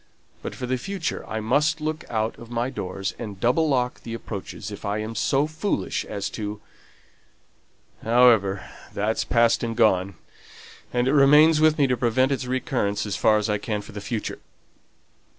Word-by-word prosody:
But - - -6
for 125 - -5
the 130 0 -1
future 190 +3 -3
I 110 - -3
must 150 +8 +2
look 155 +1 -3
out 110 0 -1
of 115 - -11
my 120 +2 -2
doors, 95 -4 -4
and 105 -5 -7
double 140 +8 +2
lock 125 -3 0
the 115 -1 -6
approaches 105 -1 -7
if 100 - -9
I 100 0 -1
am 110 +1 -4
so 135 +6 +1
foolish 155 +6 -2
as 100 -1 -4
to 105 -1 -5 1.4
However, 115 -5 +4 0.3
that's 105 +2 0
past 115 0 +2
and 115 -1 -3
gone; 100 -4 +3 0.8
and 120 +1 +1
it 135 - +2
remains 150 +2 +6
with 155 0 +4
me 145 - +4
to 125 -1 +1
prevent 130 +3 +2
its 130 -2 -2
recurrence 125 -6 -1
as 105 - -3
far 110 -1 +4
as 105 0 -1
I 105 -1 0
can 105 0 -3
for - - -12
the 105 -1 -7
future. 110 +1 -4
120 Hz, 175 wpm, -24 LUFS, 105-135 Hz, 1.4 s, remains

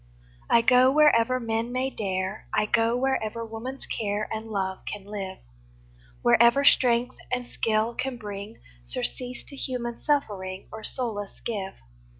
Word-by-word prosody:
I 235 - +5
go 255 +2 +6
wherever 255 -4 +5
men 230 0 -2
may 260 +2 -1
dare, 190 -1 -3
I - - +3
go 230 +2 +2
wherever 230 -3 -1
woman's 230 +4 -6
care 210 -1 -2
And 220 0 -4
love 190 -3 -2
can 205 -2 -7
live, 195 -2 -5 0.9
Wherever 235 +4 +6
strength 245 -2 +4
and 250 -1 -1
skill 225 -1 0
can 255 +1 -3
bring 205 0 -7 0.3
Surcease 245 - -3
to 280 - -10
human 245 -3 -4
suffering, 195 -10 -1
Or 220 0 -8
solace 215 -6 -3
give. 200 -4 -4
230 Hz, 140 wpm, -26 LUFS, 205-250 Hz, 0.9 s, go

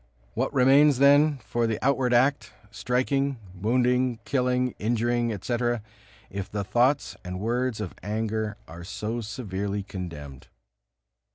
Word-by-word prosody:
What - - -1
remains 140 +1 +5
then 145 +2 +5
for 120 -1 0
the 110 -1 -1
outward 135 -2 +2
act, 120 -2 +2 0.2
striking, 130 +4 0 0.2
wounding, 125 +5 +1
killing, 125 -2 +1
injuring, 120 +1 0
etc., 120 +2 -1 0.5
if 100 0 -5
the 100 -1 -3
thoughts 125 +8 +1
and 90 0 -5
words 120 +2 -1
of 105 -5 -4
anger 110 0 -2
are 85 +1 -10
so 110 +5 -4
severely 100 -3 -4
condemned? 80 -9 -8
120 Hz, 120 wpm, -26 LUFS, 105-125 Hz, 0.5 s, remains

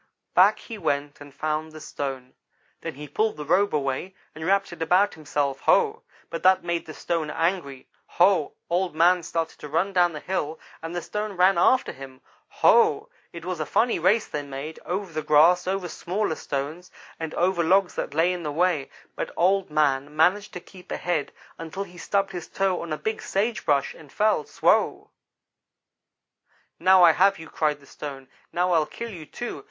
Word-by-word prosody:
"Back - - +6
he 225 -3 -9
went 145 -3 -2
and 145 0 -11
found 155 +2 -3
the 155 - -9
stone. 135 -4 -6 0.5
Then - - -5
he 150 +2 -8
pulled 215 +7 -1
the 150 - -6
robe 195 +6 +3
away, 140 +6 -2 0.2
and 155 - -8
wrapped 195 +1 +1
it 170 - -11
about 180 +5 +3
himself. 145 -3 -2
Ho! - - +2 0.3
but 165 - -4
that 185 0 +4
made 170 -1 -2
the 155 - -7
stone 165 -3 -2
angry 165 -5 -2 0.3
Ho! 180 -4 +4
Old 175 -1 -1
man 175 +2 +4
started 165 -1 -3
to - - -8
run 175 +6 0
down 175 -2 +3
the 150 - -5
hill, 160 -3 -3 0.2
and 165 +2 -6
the 175 - -3
stone 210 0 -4
ran 185 +1 +4
after 255 +8 +3
him. 130 -1 -11 0.3
Ho! 450 -2 +3 0.2
it 170 -1 -9
was 180 -2 -3
a 155 - -1
funny 235 -3 +2
race 200 +6 +3
they 150 - -4
made, 140 +2 -7
over 185 -1 -3
the 155 - -2
grass, 160 +4 +4
over 190 -1 -1
smaller 185 +2 -2
stones, 150 +5 -5 0.3
and 160 -1 -5
over 175 0 +1
logs 190 +3 +3
that 145 - -4
lay 170 +3 +3
in 180 - -5
the 150 -3 -3
way, 165 -2 +1 0.3
but - - -3
Old 190 +2 +2
man 145 -1 +1
managed 185 +6 +2
to 180 - -5
keep 180 +1 -15
ahead 170 -5 -2 0.3
until 165 +4 -5
he 175 -2 -13
stubbed 200 +1 0
his 175 -3 -6
toe 195 -2 0
on 170 - -7
a 155 - -1
big 220 +5 -3
sage 215 +4 -1
brush, 140 -2 +2
and 150 -4 -15
fell 210 -8 +1
swow! - - +1 1.7
"'Now 185 +1 +6
I 170 - +9
have 195 +4 +3
you!' 160 0 -11
cried 150 -2 0
the 140 - -19
stone 135 -2 -8 0.2
'now 180 +1 +1
I'll 160 -3 +3
kill 235 -1 -7
you, 165 -6 -9
too! 240 - -6
170 Hz, 190 wpm, -25 LUFS, 150-190 Hz, 1.7 s, I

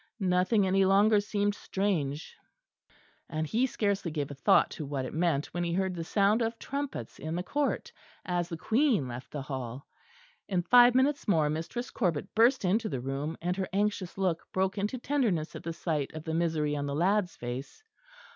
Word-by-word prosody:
Nothing 185 +2 +2
any 190 +1 +3
longer 205 +3 +5
seemed 205 0 0
strange; 165 -9 -2 0.9
and 155 -1 -2
he 235 - +1
scarcely 200 -6 -1
gave 145 -3 -3
a - - -5
thought 135 - +3
to - - -6
what 135 -2 -3
it - - -6
meant 155 -3 0
when 175 - -1
he 170 -1 -1
heard 190 +1 0
the 170 -2 -4
sound 205 +6 +2
of 230 0 -1
trumpets 275 - -5
in 160 +2 -4
the 180 - -2
court, 285 +8 -1 0.3
as 175 -1 -1
the 165 - -4
Queen 225 - +2
left 125 +1 -7
the 145 -2 -5
Hall. 130 -1 -6 0.6
In 180 -3 0
five 245 +4 +7
minutes 275 +3 +2
more 155 -7 +3
Mistress 165 +11 -4
Corbet 180 -4 -1
burst 235 0 +4
into 215 +4 +1
the 130 - -3
room; 135 +5 -3
and 180 +1 0
her 190 - -2
anxious 200 -2 -1
look 185 -4 0
broke 190 +1 0
into 210 +6 -1
tenderness 235 - 0
at - - -6
the 165 - -4
sight 155 -4 -2
of 155 - -6
the 160 - -3
misery 160 -3 0
in 145 -1 -2
the 140 - -2
lad's 185 +2 +1
face. 125 - -6
180 Hz, 190 wpm, -29 LUFS, 155-210 Hz, 0.9 s, five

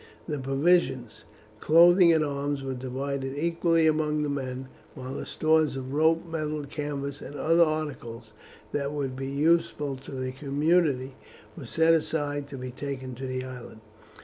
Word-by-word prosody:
The 150 -3 -2
provisions, 135 -3 +1 0.3
clothing, 170 - +6
and 160 -2 +3
arms 140 -1 -2
were 135 -1 -3
divided 135 +2 -4
equally 165 +1 +2
among 150 -1 +1
the 145 - -1
men, 130 -2 -4 0.3
while 130 0 -6
the - - -5
stores 155 -2 +2
of 130 0 -5
rope, 160 +3 +3
metal, 155 -2 -3
canvas, 140 -1 -4
and 145 - -8
other 165 +3 +3
articles 140 -8 -4 0.4
that 140 0 -2
would 135 -3 -3
be 135 +1 -4
useful 150 -1 +1
to 135 - -12
the 130 -1 -3
community 140 -1 +1 0.4
were - - -9
set 165 0 +4
aside 145 -3 -1
to 140 - -8
be 130 0 -6
taken 130 -1 -5
to 130 +2 -6
the 130 0 -3
island. 125 -3 -10
145 Hz, 155 wpm, -27 LUFS, 130-155 Hz, 0.4 s, clothing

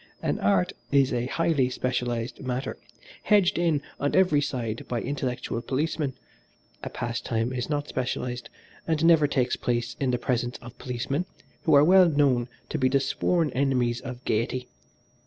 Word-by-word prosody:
An - - 0
art 95 -2 +2 0.2
is 135 -2 +4
a 120 0 -1
highly 145 -3 +1
specialised 125 -2 -2
matter 130 0 -3 0.5
hedged 200 -5 +3
in 160 -5 +1 0.2
on 145 - 0
every 180 -6 +4
side 120 -6 -3
by 120 - -1
intellectual 125 -3 -3
policemen, 145 +1 -1 0.7
a - - -5
pastime 115 0 -2
is 125 +1 -3
not 145 -1 -1
specialised, 125 -1 -3 0.4
and 160 -1 +1
never 165 -3 +6
takes 130 -3 +1
place 120 0 -2
in 135 - +1
the 125 - +1
presence 120 0 -1
of 120 0 -12
policemen, 130 +6 -2 0.4
who 155 -3 +5
are 140 - +7
well 185 +2 +7
known 140 -5 +2 0.2
to 155 - -2
be 130 -1 +3
the 140 +1 +3
sworn 160 +2 +1
enemies 125 -3 +1
of 125 -2 -8
gaiety. 120 +3 -1
130 Hz, 155 wpm, -26 LUFS, 120-145 Hz, 0.7 s, are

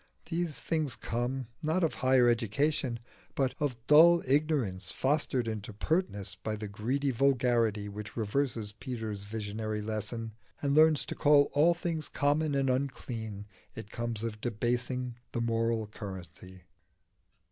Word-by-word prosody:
These 165 -2 -1
things 155 -6 0
come 125 +3 -2 0.2
not 160 +4 +1
of 165 - +2
higher 130 -1 +4
education, 120 +3 +1 0.4
but 135 -2 +1
of 145 -5 -1
dull 170 +3 +7
ignorance 130 - +1
fostered 135 -3 0
into 110 -1 -4
pertness 105 - -1
by 110 +3 -4
the 105 0 -5
greedy 125 +8 -1
vulgarity 120 -5 +2
which 105 +2 -8
reverses 115 -1 -1
Peter's 110 -3 -5
visionary 110 0 -3
lesson 110 +1 -3 0.3
and 140 -1 0
learns 155 0 +5
to - - -4
call 145 -1 +4
all 160 +5 +5
things 165 -3 -3
common 145 +1 +1
and 135 -1 +1
unclean. 120 -6 -3 0.3
It 105 - -8
comes 115 -2 -3
of 110 -2 -4
debasing 125 +2 -1 0.2
the 120 - -1
moral 115 -1 0
currency. 95 -3 -9
120 Hz, 135 wpm, -30 LUFS, 110-140 Hz, 0.4 s, dull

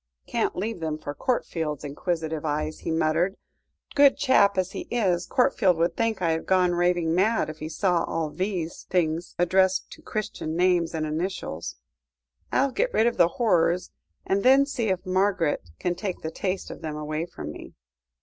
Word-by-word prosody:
"Can't - - -1
leave 215 +2 -3
them 160 -2 -2
for 145 -2 -6
Courtfield's 160 - -2
inquisitive 160 +1 -3
eyes," 155 0 -2
he - - -5
muttered. 165 +4 +1 0.6
"Good 280 -1 +6
chap 200 -8 +4
as 185 0 0
he - - -6
is, 185 -7 +1
Courtfield 235 -9 +3
would 170 +1 +1
think 225 -4 0
I 165 - +3
had 160 0 -2
gone 185 -1 +3
raving 175 -2 +1
mad, 195 -1 +2
if 155 - -14
he 155 - -5
saw 175 +1 +1
all 160 -2 -2
these 180 -2 -3
things 170 -1 0
addressed 185 +2 +2
to - - -11
Christian 210 -7 -4
names 175 -2 +2
and 155 -1 -1
initials. 155 - -3 0.8
I'll 275 +1 +2
get - - 0
rid 220 - +4
of 235 - +1
the 170 - +6
horrors, 180 -6 +2 0.3
and 195 +1 +1
then 270 +4 +6
see 255 -5 -2
if 185 -1 -1
Margaret 185 - +1
can 180 - -1
take 185 0 -4
the 160 - -4
taste 185 +3 -3
of - - -9
them 155 -2 -4
away 155 +2 -3
from 75 - -7
me." - - -11
175 Hz, 180 wpm, -26 LUFS, 160-200 Hz, 0.8 s, Good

